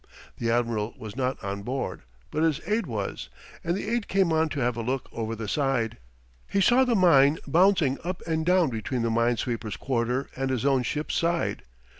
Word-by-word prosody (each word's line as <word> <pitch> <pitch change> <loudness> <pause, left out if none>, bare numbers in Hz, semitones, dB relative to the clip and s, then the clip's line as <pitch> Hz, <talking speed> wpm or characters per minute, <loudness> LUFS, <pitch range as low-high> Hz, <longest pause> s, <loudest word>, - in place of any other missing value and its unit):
The 115 - -1
admiral 115 -2 0
was 110 -1 -8
not 130 0 -1
on 100 0 -3
board, 130 +6 -3 0.3
but 155 - -1
his 160 -2 +2
aide 215 +2 0
was, - - -4 0.3
and 170 +1 0
the 200 - -5
aide 235 -1 -1
came 190 -4 +2
on 160 0 +2
to 145 - -4
have 125 -1 +1
a 115 - -3
look 130 +3 -2
over 115 0 -3
the 110 -1 -5
side. 135 -3 0 0.5
He 200 - +1
saw 245 +6 +5
the 250 -2 +2
mine 155 -6 +5
bouncing 165 -3 +3
up 180 +1 -4
and 160 -1 0
down 180 -4 +3
between 115 +2 -2
the 115 - 0
mine 115 +1 +2
sweeper's 115 -2 -3
quarter 125 +1 -1
and 135 0 -2
his 130 -1 -1
own 135 -2 +3
ship's 150 +5 -3
side. 170 0 0
135 Hz, 200 wpm, -26 LUFS, 115-170 Hz, 0.5 s, saw